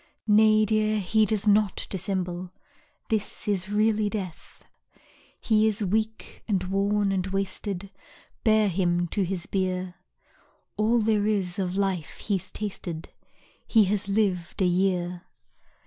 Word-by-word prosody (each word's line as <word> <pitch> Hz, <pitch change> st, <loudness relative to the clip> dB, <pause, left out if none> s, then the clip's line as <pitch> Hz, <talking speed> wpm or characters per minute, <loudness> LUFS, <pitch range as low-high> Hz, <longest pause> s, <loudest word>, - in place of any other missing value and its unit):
Nay, 215 Hz, 0 st, +5 dB
dear, 215 Hz, 0 st, +1 dB
he 215 Hz, +3 st, +2 dB
does 215 Hz, +1 st, -1 dB
not 210 Hz, -1 st, +3 dB
dissemble, 185 Hz, -2 st, -3 dB, 0.6 s
This 215 Hz, -2 st, -2 dB
is 195 Hz, -2 st, -1 dB
really 215 Hz, 0 st, +2 dB
Death. 190 Hz, -6 st, -7 dB, 0.8 s
He 220 Hz, -1 st, +3 dB
is 215 Hz, 0 st, 0 dB
weak, 220 Hz, +3 st, -2 dB
and 195 Hz, -4 st, 0 dB
worn, 200 Hz, +2 st, +1 dB
and 190 Hz, -1 st, -1 dB
wasted, 195 Hz, 0 st, -3 dB, 0.5 s
Bear 215 Hz, -2 st, +4 dB
him 175 Hz, -2 st, +1 dB
to 205 Hz, -, -1 dB
his 185 Hz, -2 st, -1 dB
bier. 185 Hz, -1 st, -2 dB, 0.8 s
All 220 Hz, +3 st, +2 dB
there 210 Hz, -1 st, +2 dB
is 195 Hz, -4 st, -1 dB
of 185 Hz, 0 st, -2 dB
life 190 Hz, -5 st, -1 dB
he's 195 Hz, -4 st, -2 dB
tasted 180 Hz, -6 st, -5 dB, 0.6 s
He 220 Hz, -2 st, +5 dB
has 200 Hz, 0 st, -1 dB
lived 195 Hz, -3 st, 0 dB
a -, -, +4 dB
year. 180 Hz, -1 st, 0 dB
200 Hz, 130 wpm, -26 LUFS, 185-215 Hz, 0.8 s, Nay